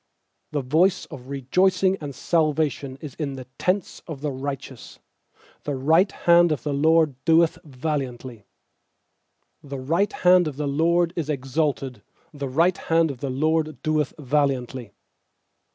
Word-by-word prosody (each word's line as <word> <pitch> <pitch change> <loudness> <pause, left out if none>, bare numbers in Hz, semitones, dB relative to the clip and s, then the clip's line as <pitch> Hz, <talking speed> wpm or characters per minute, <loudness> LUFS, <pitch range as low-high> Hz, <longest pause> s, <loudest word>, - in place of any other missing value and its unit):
15The 145 -2 -2
voice 175 +8 +2
of 125 -1 -10
rejoicing 185 +8 +2
and 140 -3 -6
salvation 150 -4 0
is 150 -5 -7
in 140 -3 -3
the 130 -1 -8
tents 185 0 -1
of 155 -5 -7
the 150 -1 -2
righteous; 135 -1 -7 0.7
The 145 - -2
right 160 +9 +3
hand 170 -1 +4
of 150 -6 -2
the 145 - -2
LORD 155 -2 +2
doeth 165 0 +3
valiantly. 130 - -4 1.2
16The 135 -1 -7
right 195 +4 +2
hand 180 -1 +4
of 145 -3 -5
the 150 - -2
LORD 170 +4 +2
is 160 -4 -3
exalted; 135 -3 -2 0.3
The 140 -2 -5
right 170 +7 +2
hand 165 -1 +2
of 130 - -10
the 140 - -3
LORD 155 +1 0
doeth 155 -3 0
valiantly. 130 -5 -1
150 Hz, 140 wpm, -24 LUFS, 135-165 Hz, 1.2 s, hand